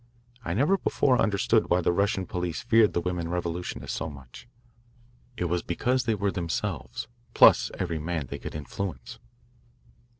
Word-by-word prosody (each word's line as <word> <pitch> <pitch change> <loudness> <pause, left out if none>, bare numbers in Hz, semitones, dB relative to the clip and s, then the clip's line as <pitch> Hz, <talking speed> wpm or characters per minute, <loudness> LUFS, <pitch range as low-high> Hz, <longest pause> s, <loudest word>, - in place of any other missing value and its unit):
I 85 -3 -2
never 150 - +3
before 130 -7 +2
understood 105 +2 +2
why 90 +1 +3
the 85 - +2
Russian 100 +1 0
police 90 -1 -3
feared 115 -3 +4
the 85 - 0
women 85 -1 -3
revolutionists 90 0 -3
so 75 - -3
much. 70 - -12 0.9
It 90 - -1
was 90 0 0
because 125 +8 0
they 115 -2 +1
were 100 -1 0
themselves, 80 -8 -3 0.3
plus - - +7
every 85 -3 -2
man 80 -1 -3
they 65 - -7
could - - -7
influence. 85 +5 -6
90 Hz, 155 wpm, -27 LUFS, 85-105 Hz, 0.9 s, plus